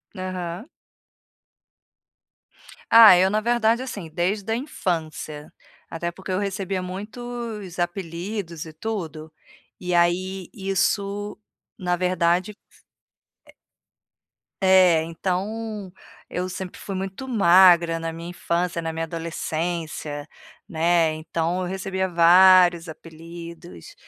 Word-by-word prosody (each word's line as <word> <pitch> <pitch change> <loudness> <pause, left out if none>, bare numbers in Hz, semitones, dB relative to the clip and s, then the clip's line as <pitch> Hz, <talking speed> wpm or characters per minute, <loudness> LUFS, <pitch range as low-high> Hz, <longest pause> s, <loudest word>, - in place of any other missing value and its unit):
Aham. 185 - -5 2.2
Ah, 225 -5 +10
eu 185 +2 +4
na 215 +1 +1
verdade, 235 +1 +1
assim, 200 -10 -7
desde 190 +6 -2
a - - +2
infância. 160 - -4 0.4
Até 170 +1 -4
porque 190 +2 -8
eu 185 - 0
recebia 195 -1 -2
muitos 210 0 -7
apelidos 175 -1 -4
e 160 - -11
tudo, 160 -5 -5 0.5
e 180 -1 -3
aí 180 +2 +1
isso, 200 +1 -1 0.4
na 180 -2 0
verdade 180 +1 +1 2.1
eh 190 - +3 0.3
É, - - -3
então, 195 +4 -4 0.4
eu 180 +1 -3
sempre 185 0 -7
fui 195 - -6
muito 195 +7 -5
magra 175 -6 +5
na 165 0 -4
minha 170 +1 -8
infância, 175 -1 -2
na 165 0 -4
minha 165 0 -3
adolescência, 160 -2 -4 0.4
né, 165 -2 +2
então 165 +3 -2
eu 180 - -2
recebia 190 0 -2
vários 175 0 +6
apelidos, 165 - -11
180 Hz, 105 wpm, -23 LUFS, 170-195 Hz, 2.2 s, Ah